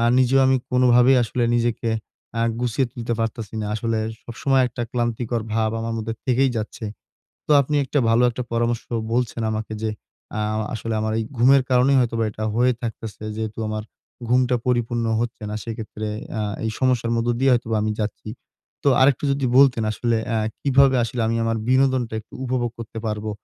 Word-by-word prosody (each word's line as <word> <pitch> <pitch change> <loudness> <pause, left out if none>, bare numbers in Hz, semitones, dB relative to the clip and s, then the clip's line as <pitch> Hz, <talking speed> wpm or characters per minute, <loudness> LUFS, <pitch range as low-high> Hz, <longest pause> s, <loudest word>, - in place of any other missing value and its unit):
আ - - +1 0.2
নিজেও 130 +1 +4
আমি 130 0 +4
কোনভাবেই 125 +1 +5
আসলে 120 +1 -2
নিজেকে 120 -1 0 0.5
আ - - +1 0.2
গুছিয়ে 125 +2 0
তুলতে 120 -2 -4
পারতাছি 115 -1 -3
না। - - -3
আসলে 115 0 -1 0.3
সবসময় 135 +3 +1
একটা 120 0 -5
ক্লান্তিকর 120 -1 -1
ভাব 110 -1 +1
আমার 115 0 -3
মধ্যে 110 +1 -3
থেকেই 130 +1 +3
যাচ্ছে। 110 +1 -5 0.6
তো - - -7
আপনি 145 +2 -2
একটা 145 +2 -1
ভালো 115 +2 +4
একটা 125 +2 -4
পরামর্শ 115 0 0 0.3
বলছেন 120 -1 0
আমাকে 110 0 -4
যে, 110 - 0 0.4
অ্যা 105 - -2 0.3
আসলে 115 0 -3
আমার 110 0 -1 0.2
ঘুমের 130 +3 +5
কারণেই 130 +2 +4
হয়তোবা 115 -2 0
এটা 110 +1 -5
হয়ে 125 +2 +3
থাকতেছে, 110 -2 -6
যেহেতু 110 -1 -4
আমার 110 0 -3 0.5
ঘুমটা 125 0 +3
পরিপূর্ণ 120 -1 0 0.2
হচ্ছে 120 -2 -4
না, 105 - -3
সেক্ষেত্রে 110 -2 -6 0.3
আ 110 - 0 0.2
এই 110 - 0
সমস্যার 125 -3 +1
মধ্য 115 +1 0
দিয়ে 135 0 +4
হয়তোবা 115 -2 +1
আমি 110 - 0
যাচ্ছি। 105 0 -4 0.6
তো - - +5
আরেকটু 135 +1 +4
যদি 135 -1 0
বলতেন, 135 -4 +5
আসলে 120 +1 0
অ্যা 115 - 0 0.2
কিভাবে 135 -1 +4
আসলে 120 +1 -4
আমি 115 +1 0
আমার 115 0 0
বিনোদনটা 130 -3 +2
একটু 110 - -18
উপভোগ 125 -2 -1
করতে 115 -1 -7
পারবো, 105 0 -3
120 Hz, 175 wpm, -22 LUFS, 115-125 Hz, 0.6 s, কোনভাবেই